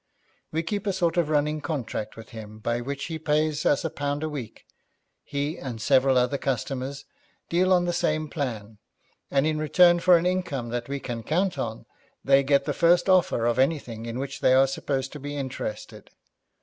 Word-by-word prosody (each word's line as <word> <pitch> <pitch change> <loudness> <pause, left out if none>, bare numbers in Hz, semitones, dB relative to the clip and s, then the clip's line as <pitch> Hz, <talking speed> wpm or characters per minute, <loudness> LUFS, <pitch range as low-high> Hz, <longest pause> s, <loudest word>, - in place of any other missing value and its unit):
We 160 +1 -1
keep 205 +3 -3
a 200 - +1
sort 175 -3 0
of 170 -3 +2
running 150 0 +1
contract 120 -9 -4
with 115 -1 -11
him 110 -1 -9
by 120 +2 -2
which 140 +2 -4
he 160 -1 -5
pays 155 0 +1
us 145 - +2
a - - 0
pound 145 +1 -2
a 155 - -1
week. 135 -7 -7 0.6
He 145 +4 -3
and 125 -4 -6
several 130 +2 +3
other 125 +3 +1
customers 135 +2 -3 0.4
deal 185 +2 +2
on 180 -1 +4
the 175 - -1
same 155 -2 0
plan, 115 -8 -5 0.5
and 135 +1 +2
in 155 -1 0
return 175 +3 +5
for 180 0 +6
an 170 - -2
income 180 -10 -1
that 120 +1 -4
we 140 0 -2
can 120 -3 -5
count 175 - 0
upon, - - -4 0.4
they 135 0 +6
get 140 0 +2
the - - -1
first 175 +3 +3
offer 180 -10 +3
of 120 +1 +1
anything 130 -5 0
in 115 +1 -4
which 135 +1 -5
they 130 - +4
are 135 +1 +6
supposed 135 0 -2
to 150 - -8
be 145 +1 -6
interested. 130 -5 -6
140 Hz, 195 wpm, -26 LUFS, 125-160 Hz, 0.6 s, for